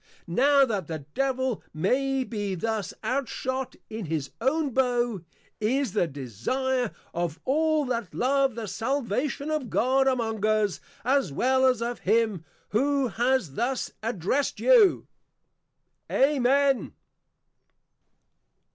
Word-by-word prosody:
Now 275 +10 +4
that 205 - -3
the 155 -4 -6
Devil 260 -3 0
may 265 - +1
be 205 -5 -3
thus 215 +1 -2
outshot 260 +1 -2
in 220 -2 -6
his 155 -3 -3
own 285 +3 +1
Bow, 240 -6 +1 0.4
is 260 +6 0
the 205 -5 +2
desire 210 - -2 0.2
of 170 -2 -2
all 310 +2 +2
that 235 -7 -3
love 270 -1 +1
the 230 -2 -4
Salvation 275 +6 -2
of 300 -6 -2
God 265 +3 +2
among 225 -5 0
us, 215 -2 +2 0.3
as 270 - +2
well 260 - +3
as 250 -3 +2
of 240 +1 -3
him, 215 -4 +1 0.3
who 275 +3 +1
has 240 - 0
thus 250 - -1
Addressed 225 - -1
you. 470 -6 +5 1.0
_Amen. 275 0 +2
250 Hz, 115 wpm, -26 LUFS, 215-270 Hz, 1.0 s, you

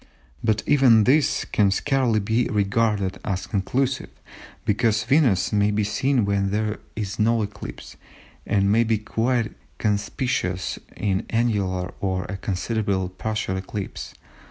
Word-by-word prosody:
But 110 -2 +1
even 130 -6 +5
this 140 +5 +3
can 100 -2 +2
scarcely 125 +1 +1
be 110 +4 +1
regarded 105 -1 0
as 95 -2 -2
conclusive, 130 +7 -1 0.6
because 110 +1 +2
Venus 125 - +3
may 105 0 +3
be 105 0 +1
seen 125 +3 +1
when 100 -1 +1
there 105 +1 -1 0.2
is 105 -1 -4
no 115 +1 +3
eclipse, 105 0 -8 0.5
and 100 -1 +2
may 115 +2 +4
be 110 -1 +1
quite 115 +2 0 0.3
conspicuous 105 -3 -1 0.2
in 100 -2 0
an - - -8
annular 100 -5 0
or 95 -2 -1
a 100 - -5
considerable 95 0 -1
partial 105 0 -3
eclipse. 95 +1 -6
105 Hz, 130 wpm, -24 LUFS, 100-115 Hz, 0.6 s, even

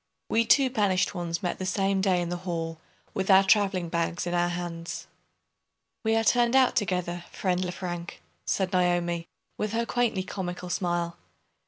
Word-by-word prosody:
We 230 +1 +3
two 265 +2 +4
banished 200 -7 +1
ones 170 -2 -3
met 180 - -2
the 185 - -3
same 195 0 +1
day 185 -2 +2
in 170 - -4
the 175 - -2
hall, 165 -2 -4 0.3
with 190 0 -2
our 190 0 +8
traveling 195 -3 +3
bags 170 +1 -1
in 175 - -2
our 175 0 +2
hands. 175 -1 -5 1.0
"We 220 0 +2
are 225 - +2
turned 240 +2 +3
out 260 -1 +5
together, 180 -4 -1
friend 185 -1 0
Lefrank," 175 -1 -5 0.2
said 190 0 -1
Naomi, 175 -2 +1 0.3
with 210 0 -1
her 230 +1 +1
quaintly 235 -6 0
comical 180 -2 -5
smile. 175 -2 -1
180 Hz, 165 wpm, -27 LUFS, 175-200 Hz, 1.0 s, our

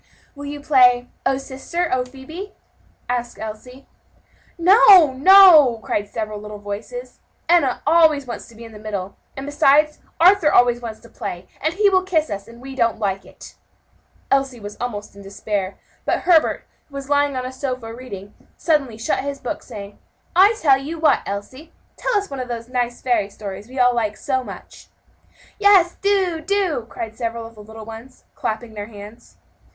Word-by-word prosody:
"Will 285 0 -9
you 290 0 -6
play 250 -4 +4 0.2
'O 270 0 +1
sister, 275 +6 -4
O 255 -1 +1
Phebe?'" 315 +10 -10 0.5
asked 240 -1 -3
Elsie. 235 +5 -9 0.7
"No, 365 - +7
no!" 310 - +7
cried 205 0 -2
several 215 -2 -4
little 210 0 -8
voices, 205 - -8 0.3
"Enna 330 -7 +2
always 310 -2 +4
wants 240 - -7
to 235 - -17
be 230 - -12
in 225 - -12
the 210 - -12
middle; 200 -3 -5 0.2
and 270 - -5
besides, 295 +1 +3 0.2
Arthur 350 -2 +5
always 245 0 +4
wants 225 -2 -7
to 235 - -15
play, 185 -4 -7
and 315 +3 -1
he 415 +1 +3
will 375 -2 +4
kiss 335 -5 -1
us; 200 0 -5
and 235 +1 -14
we 270 +1 -8
don't 235 -3 +1
like 195 -3 -2
it." - - -13 0.8
Elsie 270 -3 +1
was 205 -1 -8
almost 210 -5 -5
in 200 - -12
despair; 195 -1 -4 0.3
but - - 0
Herbert, 335 -3 +3 0.2
who 280 - -15
was 275 -1 -6
lying 285 -1 +1
on 255 - -3
a 255 - -5
sofa, 255 -4 -5
reading, 205 -5 -9 0.2
suddenly 275 -9 0
shut 225 - -1
his 280 0 -4
book, 250 - -5
saying, 205 -4 -10 0.4
"I 395 +5 +6
tell 270 -3 +4
you 305 +5 -6
what, 320 -1 +3
Elsie! 260 +11 -7 0.2
tell - - 0
us 405 0 -2
one 275 - -7
of 255 - -4
those 235 -1 -6
nice 245 -1 -2
fairy 230 -6 +1
stories 200 0 -8
we 260 +2 -12
all 250 -1 +4
like 215 -3 -1
so 260 +2 -1
much!" - - -11 0.7
"Yes, 390 -4 +5
do, 380 -5 +1
do!" 335 - -1
cried 220 -1 -6
several 230 -1 -4
of 230 - -11
the 215 - -13
little 220 +1 -11
ones, 225 +4 -11
clapping 220 +1 -4
their 205 -1 -6
hands. 210 +1 -13
255 Hz, 180 wpm, -21 LUFS, 220-305 Hz, 0.8 s, No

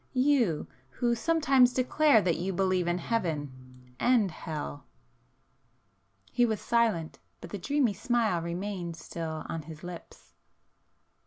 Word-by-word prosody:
—you, 255 - +2 0.2
who 235 - 0
sometimes 270 -2 +3
declare 255 -2 +4
that 170 -3 +1
you 180 +3 -2
believe 185 -1 +1
in 175 0 +1
Heaven,—and 145 - -1
Hell?" 150 - -6 1.4
He 245 - +2
was 220 -3 +1
silent, 225 -9 0 0.2
but - - -10
the 205 - -4
dreamy 265 +2 +1
smile 220 -3 +1
remained 175 0 -4
still 160 -2 -5
on 165 - -4
his 155 0 -11
lips. 175 -1 -10
185 Hz, 115 wpm, -29 LUFS, 165-240 Hz, 1.4 s, declare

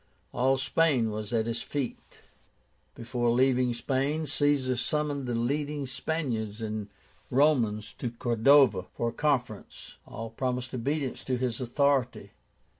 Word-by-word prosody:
All 130 +2 +2
Spain 135 -4 +2
was 105 0 -5
at 115 -2 +1
his 115 0 -2
feet. 140 -2 -5 0.7
Before 120 0 -1
leaving 125 0 +3
Spain, 140 +6 -1
Caesar 145 -3 +2
summoned 145 +1 -1
the 120 - -1
leading 145 +4 -1
Spaniards 120 -6 -3
and 110 -2 -4 0.4
Romans 120 -7 +2
to 120 - -2
Cordova, 120 -3 +4
for 120 - 0
a - - -9
conference. 125 -8 -2
All 115 0 -7
promised 125 +1 -3
obedience 135 +2 -2
to 130 -1 0
his 125 -1 -2
authority. 135 0 0
125 Hz, 125 wpm, -28 LUFS, 115-140 Hz, 0.7 s, Cordova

